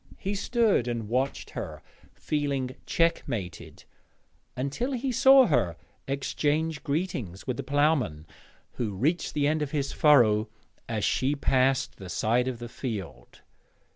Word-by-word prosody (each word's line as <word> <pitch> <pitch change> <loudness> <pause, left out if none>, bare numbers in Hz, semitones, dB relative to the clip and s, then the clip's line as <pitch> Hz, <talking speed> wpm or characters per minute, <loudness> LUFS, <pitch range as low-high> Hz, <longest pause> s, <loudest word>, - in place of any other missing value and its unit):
He 195 - -3
stood 210 - +1
and 115 -3 -3
watched 130 +5 -2
her, - - -6 0.3
feeling 140 -4 -2
checkmated, 115 - -2 0.7
until 140 - -2
he 255 +1 -1
saw 265 +2 +7
her 120 - +1 0.3
exchange 145 +2 -1
greetings 140 - -3
with 125 -2 -3
the - - -2
ploughman, 140 - +1 0.5
who 110 -5 -2
reached 155 - 0
the 145 -1 +2
end 155 +1 +1
of 150 - -1
his 140 -2 -2
furrow 115 -8 +4 0.4
as 110 -3 -1
she 135 +3 +1
passed 135 -2 +1
the 95 -2 -9
side 120 +6 +1
of 130 -2 -3
the 120 0 -7
field. 95 - -7
135 Hz, 135 wpm, -27 LUFS, 115-155 Hz, 0.7 s, saw